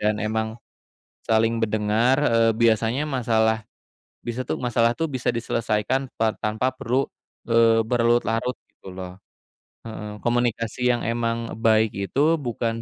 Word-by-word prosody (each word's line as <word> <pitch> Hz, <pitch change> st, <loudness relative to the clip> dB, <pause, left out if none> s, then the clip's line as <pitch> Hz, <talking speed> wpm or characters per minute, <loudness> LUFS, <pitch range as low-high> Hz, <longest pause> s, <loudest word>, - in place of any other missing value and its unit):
dan 105 Hz, 0 st, 0 dB
emang 110 Hz, +1 st, -2 dB, 0.7 s
saling 115 Hz, +1 st, +2 dB
mendengar, 110 Hz, +4 st, +2 dB
eee, 115 Hz, -3 st, +4 dB
biasanya 115 Hz, +4 st, +2 dB
masalah, 110 Hz, -4 st, +1 dB, 0.6 s
bisa 120 Hz, +2 st, -2 dB
tuh -, -, -2 dB
masalah 120 Hz, -1 st, +2 dB
tuh, 165 Hz, -1 st, 0 dB
bisa 130 Hz, -2 st, -3 dB
diselesaikan 115 Hz, +2 st, -1 dB
pa 110 Hz, -1 st, +1 dB
tanpa 110 Hz, +4 st, -1 dB
perlu, 130 Hz, +2 st, -1 dB, 0.4 s
eee, 115 Hz, -1 st, +5 dB
berlarut 120 Hz, 0 st, +2 dB
larut, 125 Hz, +3 st, -1 dB
gitu -, -, -15 dB
loh 90 Hz, -1 st, -8 dB, 0.7 s
heeh, 105 Hz, -1 st, -7 dB
komunikasi 120 Hz, 0 st, 0 dB
yang 120 Hz, -, 0 dB
emang 115 Hz, 0 st, -2 dB
baik 110 Hz, -1 st, +4 dB
itu 100 Hz, +8 st, -1 dB, 0.2 s
bukan 115 Hz, -2 st, -2 dB
115 Hz, 130 wpm, -23 LUFS, 110-120 Hz, 0.7 s, eee